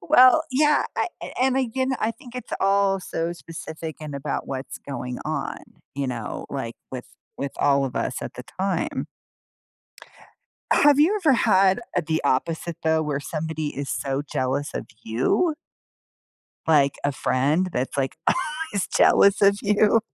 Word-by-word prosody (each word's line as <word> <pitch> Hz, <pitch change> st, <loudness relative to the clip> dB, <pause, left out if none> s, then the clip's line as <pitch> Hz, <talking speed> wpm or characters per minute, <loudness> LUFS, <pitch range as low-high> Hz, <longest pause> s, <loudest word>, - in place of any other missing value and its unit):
Well, 255 Hz, -, +7 dB
yeah, 295 Hz, +3 st, +3 dB
I -, -, +1 dB, 0.3 s
and, 260 Hz, 0 st, +3 dB
again, 260 Hz, +1 st, 0 dB
I 220 Hz, -, +1 dB
think 245 Hz, 0 st, -13 dB
it's 250 Hz, -, -7 dB
all 195 Hz, 0 st, +3 dB
so 165 Hz, -1 st, -3 dB
specific 160 Hz, -2 st, -8 dB
in 150 Hz, -2 st, -6 dB
about 140 Hz, +1 st, -3 dB
what's 135 Hz, 0 st, -5 dB
going 125 Hz, -2 st, -5 dB
on, 155 Hz, -2 st, -3 dB, 0.4 s
you 140 Hz, 0 st, -2 dB
know, 120 Hz, -3 st, -4 dB
like, 125 Hz, -4 st, -4 dB, 0.2 s
with 130 Hz, -2 st, -6 dB, 0.3 s
with 140 Hz, -1 st, -4 dB
all 140 Hz, -1 st, +3 dB
of 130 Hz, -, -4 dB
us 115 Hz, +2 st, -2 dB
at -, -, -6 dB
the 125 Hz, -, -7 dB, 0.2 s
time. 190 Hz, -2 st, -1 dB, 1.7 s
Have 290 Hz, -1 st, +5 dB
you 320 Hz, +8 st, +5 dB
ever 300 Hz, -6 st, +5 dB
had, 190 Hz, -2 st, +4 dB, 0.2 s
uh, -, -, +4 dB
the 160 Hz, 0 st, 0 dB
opposite, 160 Hz, +5 st, 0 dB
though, 160 Hz, 0 st, +2 dB
where 145 Hz, -2 st, -2 dB
somebody 155 Hz, 0 st, -3 dB
is 140 Hz, 0 st, -4 dB
so 135 Hz, 0 st, -1 dB
jealous 135 Hz, +2 st, -1 dB
of -, -, -4 dB, 0.2 s
you? 130 Hz, -, +1 dB, 1.1 s
Like, 145 Hz, -3 st, +4 dB
a 145 Hz, -, +2 dB
friend 145 Hz, +9 st, +1 dB
that's, 125 Hz, +2 st, -2 dB
like, 135 Hz, -1 st, -1 dB, 0.2 s
always 310 Hz, -, -2 dB
jealous 200 Hz, 0 st, +4 dB
of 200 Hz, 0 st, +5 dB
you. 210 Hz, +2 st, +4 dB
160 Hz, 150 wpm, -24 LUFS, 140-210 Hz, 1.7 s, Well